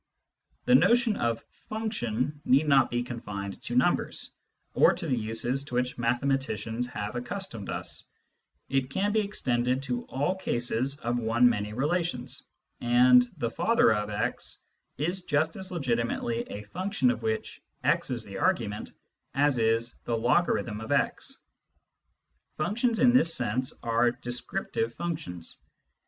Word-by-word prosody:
The - - +4
notion 220 - +5
of 115 - -1 0.2
function 150 - -2
need 140 +4 +4
not 135 -3 +5
be 120 0 -1
confined 105 -5 -6
to - - -5
numbers, - - +1 0.4
or - - +5
to - - -6
the 130 - +1
uses 115 +4 -1
to 125 - -6
which 125 0 -1
mathematicians 120 -2 0
have 105 -2 -5
accustomed 120 - -4
us; - - -3 0.6
it 135 -1 0
can 195 +8 0
be 220 - +2
extended 130 - 0
to 125 -2 -2
all 145 +7 0
cases 125 -4 0
of 120 +1 0
one 115 +2 +4
many 105 -3 0
relations, 150 0 -1 0.4
and 125 +1 +6
" - - -26
the 115 -1 -1
father 230 - +3
of 105 0 -2
x 105 +4 -2 0.2
" - - -51
is 175 +6 -1
just 155 +2 +1
as 190 -1 -5
legitimately 120 -5 -1
a 105 - -6
function 175 - 0
of 115 - -4
which 110 -1 -3 0.2
x - - +2
is 120 -3 -1
the 100 -2 -7
argument 105 -1 0 0.4
as 140 -2 +3
is 115 +1 +2
" - - -41
the 115 - 0
logarithm 120 -3 +1
of 110 - -6
x." - - 0 1.2
Functions 225 +9 +1
in 245 +1 +5
this 210 -10 +5
sense 125 +1 0
are 115 +1 +3
descriptive 120 - -3
functions. 155 - -5
125 Hz, 145 wpm, -28 LUFS, 115-150 Hz, 1.2 s, and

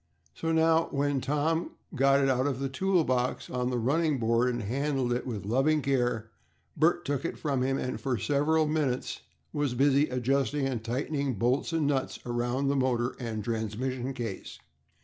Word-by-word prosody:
So 165 - -2
now, 160 0 +3
when 140 -1 0
Tom 150 +5 0 0.2
got 135 0 +4
it 135 - +3
out 130 0 +2
of 135 -3 -1
the 135 0 -2
tool 180 +5 +2
box 125 -2 -1
on 125 0 -1
the 125 - -1
running 145 +5 +1
board 115 +1 +2
and 120 -2 -3
handled 130 +2 0
it 125 - -3
with 110 -6 -4
loving 135 +7 +2
care, 120 -5 0 0.4
Bert 170 +3 +2
took 145 +1 -1
it 170 - -3
from 140 -4 -1
him, 135 +1 +1
and 130 -1 -3
for 130 -3 0
several 150 +7 +2
minutes 150 -5 -1 0.3
was 145 -4 -1
busy 140 +3 +3
adjusting 135 +2 0
and 125 -4 -2
tightening 135 +2 -1
bolts 125 - +1
and 165 -2 +1
nuts 140 -2 0
around 120 +3 -1
the 140 - +2
motor 125 -2 0
and 115 -4 -4
transmission 120 +4 -3
case. 115 -6 -5
135 Hz, 175 wpm, -29 LUFS, 120-145 Hz, 0.4 s, got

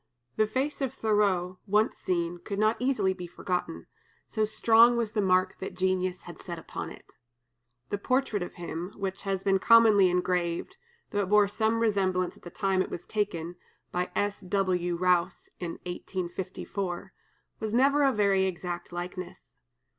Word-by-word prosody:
The 215 - +3
face 270 +7 -2
of 265 -3 0
Thoreau, 195 -4 +1
once 210 +2 +2
seen, 175 -1 -1
could 200 +3 -5
not 215 +2 +3
easily 250 -7 +1
be 180 -1 -7
forgotten, 175 - -3 0.4
so 215 - 0
strong 230 +2 +5
was 230 -3 -1
the 215 - 0
mark 185 -1 +2
that 190 - -6
genius 185 -1 0
had - - -10
set - - -6
upon - - -6
it. - - -15 0.7
The 205 - -1
portrait 255 -3 0
of 175 - -5
him, 175 +2 -5
which 195 -1 -4
has 195 -1 -2
been 195 -1 +3
commonly 215 -4 +6
engraved, 180 -1 -1 0.3
though 205 - 0
it 190 - -2
bore 210 0 +5
some 220 +2 0
resemblance 190 -5 +1
at - - -19
the 175 - -9
time 195 0 0
it - - -2
was 175 - -6
taken 175 -5 -2 0.3
(by 180 0 -1
S. 205 0 0
W. 180 -2 0
Rowse, 180 0 +1
in 170 -2 -4
1854), 185 +1 -4 0.5
was 220 -1 -3
never 275 +5 +4
a 275 -1 +5
very 200 -4 +3
exact 175 -1 -4
likeness. 175 -5 -7
190 Hz, 160 wpm, -28 LUFS, 180-210 Hz, 0.7 s, commonly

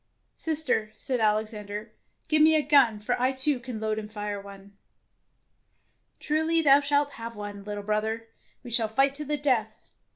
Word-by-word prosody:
"Sister," 305 -9 0
said 255 +2 -2
Alexander, 210 -1 -2 0.3
"give 310 0 +3
me 315 +1 +6
a 305 - +3
gun, 275 -6 +4
for 230 +4 -1
I 255 +1 +3
too 265 +1 +2
can 240 -2 -7
load 215 0 -1
and 210 0 -9
fire 205 -1 -4
one." 200 0 -13 1.4
"Truly 320 +2 +1
thou 280 -1 +7
shalt 285 0 +1
have 230 0 -6
one, 205 -1 -7
little 205 0 -6
brother. 220 +2 -2 0.3
We 245 - -9
shall 230 -1 +3
fight 270 +5 +2
to 300 +2 -4
the 295 +1 -1
death. 240 -7 -1
230 Hz, 165 wpm, -27 LUFS, 210-285 Hz, 1.4 s, thou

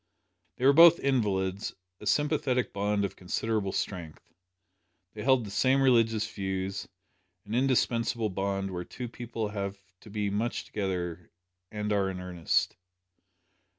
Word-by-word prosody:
They 125 - -2
were 140 - +7
both 170 +2 +8
invalids 100 -7 0 0.2
a - - -7
sympathetic 140 -6 +1
bond 100 0 0
of 100 - -5
considerable 100 +2 -1
strength. 85 -7 -5 0.8
They 105 - -7
held 130 -1 +3
the 100 - -8
same 130 +6 +3
religious 115 -5 +3
views 95 0 -3 0.6
an 105 - -7
indispensable 120 -3 +1
bond 95 0 -2
where 90 -1 -4
two 125 +7 -7
people 115 -2 -4
have 100 -1 -4 0.2
to 110 - -14
be 105 -1 -2
much 110 +4 -2
together, 90 -4 -3 0.4
and 105 0 -2
are 100 -2 +1
in 95 -1 -5
earnest. 90 -1 0
105 Hz, 135 wpm, -29 LUFS, 95-120 Hz, 0.8 s, both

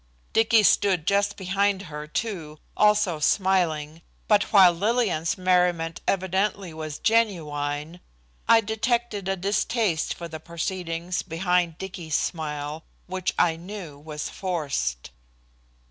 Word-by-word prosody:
Dicky 225 0 +4
stood 185 -3 +3
just 200 +1 +1
behind 195 +1 0
her 150 -4 -7
too, 165 -5 -4 0.2
also 210 -6 +3
smiling, 165 -3 +1 0.3
but 210 -1 +4
while 190 -4 +7
Lillian's 205 -2 0
merriment 180 -2 +1
evidently 190 -1 0
was 155 -2 -6
genuine, 160 -8 0 0.5
I 225 - +7
detected 220 -1 -1
a 195 - +1
distaste 200 -1 0
for 170 - -7
the 160 -1 -8
proceedings 170 +1 -3
behind 175 -1 0
Dicky's 180 -5 -5
smile, 150 -1 -3 0.2
which 185 0 -3
I 165 -2 +3
knew 175 -5 -8
was 150 0 -6
forced. 140 - -3
180 Hz, 115 wpm, -25 LUFS, 160-200 Hz, 0.5 s, while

